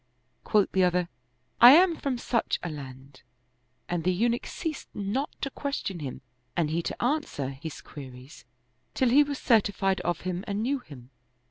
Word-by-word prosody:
Quoth 210 -3 +2
the 190 - +3
other, 180 -1 +1 0.3
" 125 +1 -45
I 245 +2 +11
am 345 +2 +6
from 275 -5 -2
such 235 -1 -1
a 175 - -3
land," 135 -2 -10 0.7
and 175 -2 -2
the 185 - +2
Eunuch 235 +6 0
ceased 320 -4 -5
not 210 +9 -2
to 275 - -2
question 275 -12 -4
hini 135 -3 -6 0.4
and 160 -3 +1
he 165 +2 0
to - - -5
answer 245 - -1
his 140 +3 -8
queries, 130 -1 -11 0.5
till 260 - +3
he 275 +5 +6
was 285 -1 -4
certified 200 -5 +2
of 175 -1 -2
him 185 0 -3
and 205 +2 -2
knew 275 +3 0
him. 135 - -14
190 Hz, 170 wpm, -27 LUFS, 150-250 Hz, 0.7 s, I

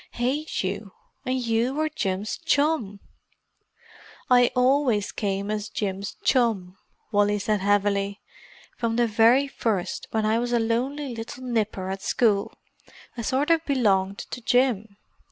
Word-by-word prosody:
"Hate 270 +5 -1
you!—and 215 +6 -5
you 230 +3 +1
were 310 +1 +1
Jim's 195 -7 -3
chum!" 280 -10 0 1.3
"I 245 -1 +6
always 250 -5 +2
came 200 0 -2
as 215 0 -3
Jim's 200 -1 -4
chum," 215 -8 +1 0.4
Wally 205 0 +3
said 210 +1 0
heavily. 200 0 +1 0.6
"From 230 -1 -1
the 240 0 +3
very 230 +5 +4
first, 215 -9 -2
when 220 -1 0
I 220 +2 +2
was 240 0 -2
a 240 - +3
lonely 255 +5 -1
little 230 +3 -7
nipper 215 -6 -2
at 195 0 -5
school, 210 -4 +1 0.6
I 240 - -4
sort 270 +7 0
of 330 -1 +3
belonged 200 -9 +1
to 250 - -5
Jim. 225 -5 +1
225 Hz, 135 wpm, -25 LUFS, 200-250 Hz, 1.3 s, I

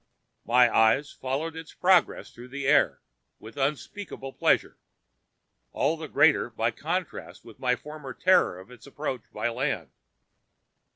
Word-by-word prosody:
My 125 +1 +5
eyes 110 +6 +3
followed 145 +5 -4
its 160 -1 -10
progress 185 -1 +2
through 120 +1 -12
the 140 +2 -6
air 110 - +3 0.4
with 110 +1 -13
unspeakable 135 - -4
pleasure, - - +1 0.9
all 160 - +1
the 160 -1 -7
greater 145 -2 +3
by 115 0 -1
contrast 170 +8 -5
with 115 - -14
my 125 -1 +1
former 150 0 -9
terror 185 - +3
of 95 +6 -14
its 125 +1 -14
approach 140 -3 -4
by - - -2
land. 115 - -3
135 Hz, 135 wpm, -27 LUFS, 120-155 Hz, 0.9 s, My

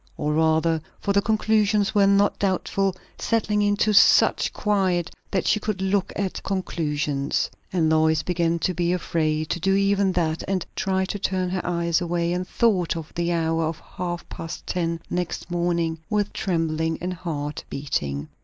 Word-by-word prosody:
Or 150 - -1
rather, 160 +1 +2 0.2
for 200 - 0
the 200 - +4
conclusions 215 -1 +2
were 200 -2 +5
not 200 +1 +3
doubtful, 195 0 0 0.2
settling 210 -2 +1
into 205 +1 +2
such - - +5
quiet 190 -5 0 0.2
that 190 - -1
she 215 - +3
could 210 -2 -3
look 190 0 0
at 195 -2 -2
conclusions. 150 -7 -1 0.2
And 170 -4 +2
Lois 160 0 +3
began 170 -1 0
to 185 - +1
be 175 0 0
afraid 155 -3 -1
to 175 - -1
do 195 +3 +2
even 200 0 +2
that, 165 -2 0
and 190 -2 -1
tried 190 -2 0
to 205 - -3
turn 185 -2 -1
her 185 -1 -1
eyes 170 0 0
away, 170 0 0
and 180 +1 -2
thought 190 -8 +1
of 160 -2 -8
the 170 0 -1
hour 165 -1 +1
of 160 0 -3
half 175 -1 -5
past 165 0 -7
ten 170 -2 -1
next 180 0 -3
morning 170 -2 0
with 210 -1 0
trembling 160 -3 -1
and 180 +1 -3
heart 155 -4 -4
beating. 75 - -3
175 Hz, 165 wpm, -24 LUFS, 165-195 Hz, 0.2 s, were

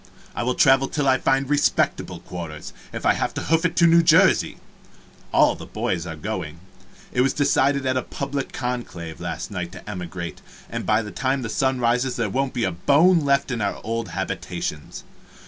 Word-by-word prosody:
I - - -3
will 125 +1 0
travel 135 0 +5
till 145 -1 -1
I 130 -1 +4
fiend 135 0 +1
respectable 145 +1 +1
quarters, 80 -4 -7 0.2
if - - -6
I - - +5
have - - -2
to - - -2
hoof 165 +2 +1
it 165 0 0
to 170 - +5
New 170 0 +6
Jersey. 165 -1 +4 0.7
All - - +5
the - - -10
boys 85 -1 -2
are 80 - -5
going. 75 +1 -5 0.5
It 125 - +1
was 135 +1 +2
decided 140 -1 +2
in 130 -1 +1
public 140 -1 -4
conclave, 120 -10 -5
last - - -5
night, 90 -3 -4
to 90 - -12
emigrate, 90 -3 -6 0.3
and - - -4
by 110 +1 +3
the 105 - -7
time 130 0 -1
the 115 - -4
sun 130 +1 0
rises 125 +2 +1
there 110 -4 -1
won't 135 +2 -1
be 120 - 0
a 95 - +1
bone 150 - +4
left 140 -2 +1
in 115 -3 -2
our 100 -1 -1
old 115 -1 -3
habitations. - - -5
125 Hz, 190 wpm, -23 LUFS, 100-140 Hz, 0.7 s, New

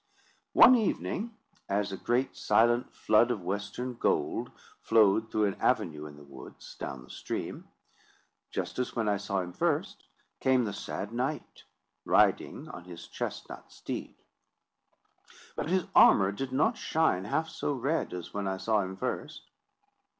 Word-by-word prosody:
One 255 - +9
evening, 225 0 -1 0.3
as 100 0 0
a - - -3
great 120 +6 0
silent 120 +3 +2
flood 110 +3 +3
of 110 -7 -2
western 100 +7 -3
gold 115 - 0 0.3
flowed 110 0 +4
through 110 -1 +1
an 100 - -3
avenue 75 -2 0
in 75 - -11
the 75 - -13
woods, 70 -2 -12
down 65 -2 -6
the 65 - -18
stream, - - -5 0.8
just - - -4
as 125 - -2
when 115 -3 0
I 100 -1 +2
saw 100 -1 -2
him 90 0 -7
first, - - -1 0.3
came 130 -2 +3
the 100 - -3
sad 100 +3 -5
knight, 135 +5 -4 0.4
riding - - +2
on 90 - -9
his 85 -2 -10
chestnut - - -6
steed. - - -6 1.4
But - - -3
his 185 0 +1
armour 95 -1 +7
did 130 +6 -5
not 210 - +1
shine 155 - +1
half 155 +9 0
so 160 - -3
red 140 +4 -1
as 90 -1 -7
when 100 -1 -2
I 95 0 -1
saw 110 +2 +1
him 95 0 -5
first. - - -4
105 Hz, 150 wpm, -29 LUFS, 95-130 Hz, 1.4 s, One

